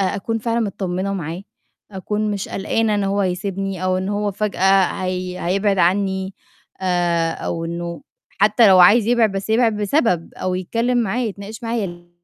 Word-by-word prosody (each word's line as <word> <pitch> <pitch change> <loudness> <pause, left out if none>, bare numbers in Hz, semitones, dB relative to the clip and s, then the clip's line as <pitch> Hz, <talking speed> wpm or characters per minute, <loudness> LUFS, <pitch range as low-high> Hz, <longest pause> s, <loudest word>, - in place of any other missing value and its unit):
أ - - +3
أكون 225 +3 -2
فعلًا 230 +1 -1
متطمنة 195 -2 -2
معاه، 170 0 -5 0.5
أكون 210 +2 -2
مش 200 -1 -3
قلقانة 215 +2 0
إن 205 -1 0
هو 200 +1 0
هيسيبني 190 0 -2
أو 185 0 +1
إن 190 +1 -3
هو 205 0 -1
فجأة 195 -1 +2 0.2
هي 185 0 -3
هيبعد 195 +1 +1
عنّي 190 +1 +1 0.5
آآ، 175 -3 +1
أو 165 0 -4
إنه 170 -1 -5 0.3
حتّى 210 +2 +4
لو 185 -1 +6
عايز 210 +5 +6
يبعد 235 -3 +3
بس 195 +2 -4
يبعد 225 -1 +3
بسبب 205 - 0
أو 185 0 -2
يتكلِّم 230 +7 0
معايا، 235 +2 0
يتناقش 210 +4 -9
معايا، 190 -7 -4
195 Hz, 160 wpm, -20 LUFS, 185-215 Hz, 0.5 s, لو